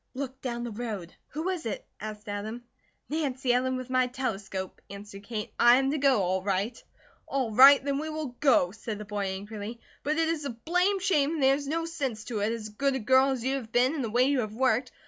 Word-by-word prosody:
Look 265 0 -5
down 240 -2 -3
the 240 - -4
road." 210 -6 -5
"Who 320 +5 -3
is 355 -9 -3
it?" 210 - -4
asked 215 0 -7
Adam. 215 +4 -5 0.4
"Nancy 270 -5 0
Ellen, 260 +1 +1
with 255 0 -7
my 255 -1 +3
telescope," 200 -7 -4
answered 200 0 -9
Kate. 215 -2 -5
"I 240 0 +8
am 270 +1 +2
to 305 - -1
go, 270 -7 +4
all 185 +1 0
right." 200 +4 -2 0.4
"All 265 -4 -1
right, 270 +5 +8
then 280 -1 0
we 315 +1 -4
will 305 -5 -5
go," 245 -11 +4
said 220 0 -6
the 210 - -7
boy, 205 -1 -3
angrily. 205 +4 -6 0.2
"But 305 +2 -1
it 325 0 +2
is 325 -2 -1
a 280 - -3
blame 360 - +1
shame 325 -6 +2
and 295 - -1
there 265 0 +6
is 285 0 -3
no 330 +3 -1
sense 270 -10 -3
to 220 -1 -4
it, 210 +2 +1
as 225 -2 -4
good 270 +6 0
a - - -1
girl 260 +4 +4
as 260 -3 -2
you 265 +2 0
have 230 -4 -8
been, 250 +4 +3
and 290 -5 -2
the 230 - -2
way 240 +3 +3
you 275 0 +2
have 215 -2 -3
worked. 255 0 +1
250 Hz, 235 wpm, -28 LUFS, 215-275 Hz, 0.4 s, I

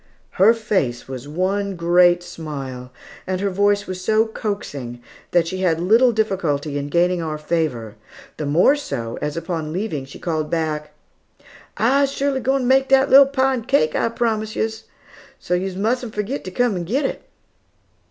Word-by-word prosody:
Her 220 +4 +7
face 190 - -1
was 130 0 -7
one 190 +5 -1
great 175 +1 +4
smile, 135 -7 -7 0.4
and 185 0 -1
her 200 0 -1
voice 205 +1 +2
was 185 -1 -6
so 220 +2 +3
coaxing 145 - -5 0.3
that 175 -1 +3
she 185 +2 -4
had 170 -4 +1
little 225 +8 +4
difficulty 165 -10 -1
in 140 0 -5
gaining 175 +2 +2
our 155 -2 -3
favor, 150 -9 -2 0.4
the 150 - -3
more 170 - +4
so, 115 - -5
as 150 +2 -3
upon 165 -3 -3
leaving, 170 -6 -3
she 135 - -12
called 155 -3 -2
back, 155 -2 -2 0.9
"I's 275 +4 +3
surely 275 -1 -1
g'wine 265 +2 +1
ter - - -2
make 265 +1 +3
dat 270 0 +4
little 275 +1 +9
pie 270 -1 +1
and 235 -4 -4
cake 155 - +2
I's 230 - 0
promised 220 -2 -1
yos, 220 0 -3 0.5
so - - -4
yos 185 +1 -1
mustn't 225 +3 -1
forgit 210 +7 -3
to - - -4
come 200 -3 0
git 260 - -1
it." - - -3
185 Hz, 170 wpm, -21 LUFS, 155-225 Hz, 0.9 s, little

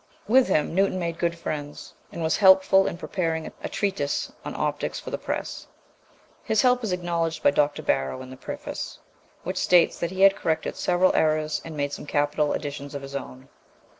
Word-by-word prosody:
With 255 +4 +5
him 150 - +1
Newton 195 +1 +2
made 170 -2 -3
good 170 -1 0
friends, 145 -3 -6 0.2
and 170 - -5
was 160 - +1
helpful 190 -1 +6
in - - -3
preparing 165 -3 -2 0.2
a - - -3
treatise 190 -9 -2
on - - -6
optics - - -2
for - - -8
the - - -1
press. - - -4 0.8
His 220 0 +2
help 250 -1 +3
is 215 - -1
acknowledged 170 -3 -2
by - - +6
Dr. 145 0 +1
Barrow 65 - -1
in 130 - -11
the - - -8
preface, - - -6 0.5
which - - -4
states 180 -1 +4
that 170 - -1
he 190 +1 -4
had 195 0 +7
corrected 160 -4 -1
several 180 +1 +2
errors 155 -1 +1
and 160 -2 -8
made 145 0 -1
some 145 - -7
capital 145 0 +1
additions 145 -1 -5
of 140 - -5
his 135 0 -8
own. 130 -1 -7
165 Hz, 190 wpm, -25 LUFS, 145-185 Hz, 0.8 s, had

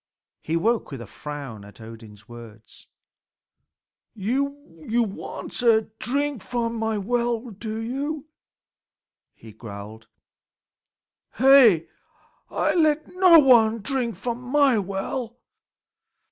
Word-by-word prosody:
He 165 +1 -1
woke 225 +7 0
with 135 - -7
a 120 - -8
frown 140 -4 -8
at 105 +3 -15
Odin's 110 -2 -13
words. 115 -2 -14 1.3
"You 225 +6 -1 0.7
want - - -7
a 225 -3 +3
drink 280 0 -1
from 235 +2 -3
my 220 -1 -2
well, 235 +2 -1
do 215 +2 -6
you?" 275 +6 -4 1.1
he 110 - -14
growled. 105 0 -10 1.3
"Hey! 250 - +6 0.6
I - - 0
let 310 -3 +2
no 365 -2 +7
one 230 -6 +5
drink 240 0 -2
from 240 0 -4
my 265 -2 +3
well." 210 +5 -4
225 Hz, 105 wpm, -24 LUFS, -, 1.3 s, no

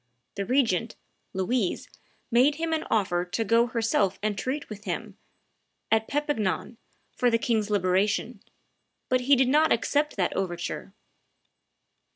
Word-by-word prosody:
The 200 -1 -4
regent, 230 -5 +1 0.4
Louise, 190 +2 -1 0.4
made 255 +5 +4
him 325 +1 -2
an 315 - -1
offer 180 -5 +1
to 180 +5 -2
go 230 +2 +3
herself 225 -5 +1
and 215 -1 0
treat 270 +7 -3
with 210 -1 -9
him, 200 +2 -4 0.8
at 220 0 +2
Perpignan, 275 -7 -1 0.4
for 250 - +2
the 230 - +3
king's 220 -2 0
liberation; 200 +3 0 0.7
but 255 0 +2
he 275 +3 +5
did 260 0 +3
not 305 +3 +4
accept 300 +1 +1
that 185 -3 0
overture. 185 +1 -4
225 Hz, 135 wpm, -27 LUFS, 195-255 Hz, 0.8 s, he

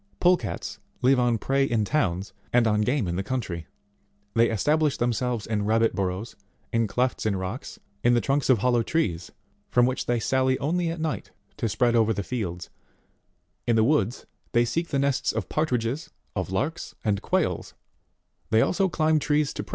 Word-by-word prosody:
Pole 180 +1 +6
cats 110 - -5 0.2
live 130 +1 +5
on 120 -2 +2
prey 135 +5 +1
in 115 -5 +1
towns, 100 - 0 0.2
and 120 -1 +4
on 105 -1 +2
game 125 -1 +1
in 85 0 -2
the - - 0
country; 95 -9 -3 0.7
they 115 0 +4
establish 150 +7 +2
themselves 120 -1 -1
in 105 -2 -1
rabbit 115 +2 +2
burrows, 95 +4 -3 0.4
in 115 -1 +2
clefts 125 +2 0
of 105 - +1
rocks, 95 +7 -5 0.3
in 120 0 +5
the - - +4
trunks 135 +4 0
of 130 - +6
hollow 120 +2 +2
trees, 95 - -1 0.4
from 120 0 +4
which 130 +1 -2
they 120 -1 +1
sally 130 +2 +2
only 170 +4 0
at 165 0 -4
night 155 -1 -3 0.3
to 115 - -1
spread 120 +2 +2
over 110 -1 +3
the 100 -1 -3
fields; 90 -7 -4 1.0
in 120 - +3
the 110 - +4
woods, 135 -1 +1 0.3
they 120 0 +4
seek 165 +8 -1
the 140 - -1
nests 140 -1 +1
of - - -4
par 155 +1 +1
tridges, 125 +5 -2 0.3
of - - -2
larks, 140 - -2
and 100 -2 +1
quails; - - -1 0.7
they 110 0 +4
also 190 - +2
climb 155 -1 +2
trees 150 0 +1
to - - -4
prey; - - -9
they - - -30
17. - - -16
120 Hz, 190 wpm, -26 LUFS, 110-140 Hz, 1.0 s, Pole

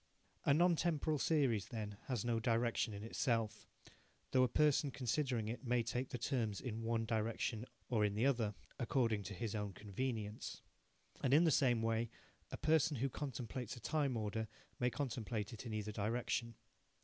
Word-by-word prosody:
A 140 - +6
non 175 +2 +5
temporal 155 -2 +1
series, 130 - +2
then, 105 -4 -4
has 125 -3 -1
no 115 -1 +2
direction 115 0 +1
in 100 0 -6
itself, 115 -2 0 0.6
though 130 - +5
a 130 - +6
person 150 +3 +3
considering 125 -3 0
it 115 +5 -4
may 120 -1 +2
take 125 +3 -2
the - - -3
terms 115 -4 0
in 115 -4 -4
one 115 0 0
direction 110 +1 -1 0.2
or 115 -4 +2
in 105 -1 +2
the 110 +4 +2
other, 115 -7 +2 0.2
according 115 -4 +2
to 100 +2 -5
his 110 +3 -3
own 105 -2 -2
convenience. 105 +1 -4 0.6
And 135 +1 +4
in 160 - +7
the 165 - +5
same 120 -6 +3
way 115 0 +1 0.4
a - - -5
person 155 -2 +3
who 135 +4 +1
contemplates 125 -3 -4
a - - -9
time 145 -3 0
order 110 +1 -2 0.3
may 125 - +3
contemplate 115 -5 -3
it 115 +2 -7
in 110 - -4
either 105 0 -2
direction. 115 +2 -1
115 Hz, 175 wpm, -38 LUFS, 110-130 Hz, 0.6 s, in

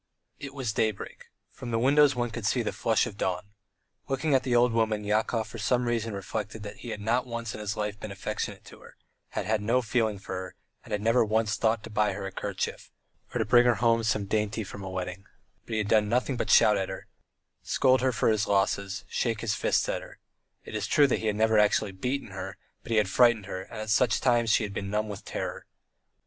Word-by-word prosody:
It 140 -1 -8
was 125 -6 -2
daybreak; 110 -2 -2 0.3
from 125 -3 -8
the 115 - 0
windows 140 +4 +5
one 120 -1 -1
could - - -3
see - - +1
the - - -1
flush - - +2
of 100 - -8
dawn. 95 +2 -2 0.6
Looking 140 +3 0
at 130 - +4
the 130 -2 0
old 120 0 +4
woman, 110 -2 +1
Yakov 110 +2 0
for 115 +2 -9
some 125 +3 +1
reason 115 -2 -1
reflected 105 +2 -5
that 105 0 -8
he 120 - -8
had 105 - -4
not 120 +4 +1
once 115 -2 -4
in - - -7
his 105 -1 -3
life 105 -1 -3
been 110 - -6
affectionate 95 - -4
to - - -13
her, - - -15 0.4
had - - -2
had 110 -1 +1
no 120 +4 +2
feeling 110 -2 0
for 95 - -8
her, 95 0 -6 0.3
had 105 0 -4
never 115 +2 +4
once 110 0 +1
thought 110 -1 +1
to 115 - -9
buy 105 -1 +1
her 95 0 -5
a 95 - -4
kerchief, - - -4 0.4
or - - -2
to - - +1
bring 120 0 +5
her 120 - +4
home 115 +2 +3
some 110 -3 0
dainty 105 +2 -1
from 100 0 -9
a 95 - -5
wedding, 90 +1 -5 0.4
but 115 - -3
had 105 -1 0
done 105 0 +3
nothing 125 +3 +1
but - - -2
shout 105 -1 +6
at 95 -1 -2
her, 95 - -7 0.6
scold 130 -1 +3
her 130 0 +2
for 115 - +1
his 110 -2 +1
losses, 100 0 0
shake 115 -3 -1
his 115 -3 0
fists - - +1
at - - -2
her; - - -13 0.5
it - - -9
is 105 -1 -2
true 145 +4 +5
he 110 - 0
had 105 - +1
never 110 0 +3
actually 105 -1 +3
beaten 125 +9 -3
her, 95 -1 -7 0.2
but - - -14
he 115 - +2
had 105 -2 +3
frightened 120 0 +4
her, 95 -1 -5
and 100 - -9
at 110 0 -3
such 115 +1 +3
times 120 -3 +2
she 110 - +4
had 105 - -4
always 100 - -3
been 100 - -5
numb 105 +1 -1
with 100 - -7
terror. - - -5
110 Hz, 235 wpm, -28 LUFS, 105-120 Hz, 0.6 s, shout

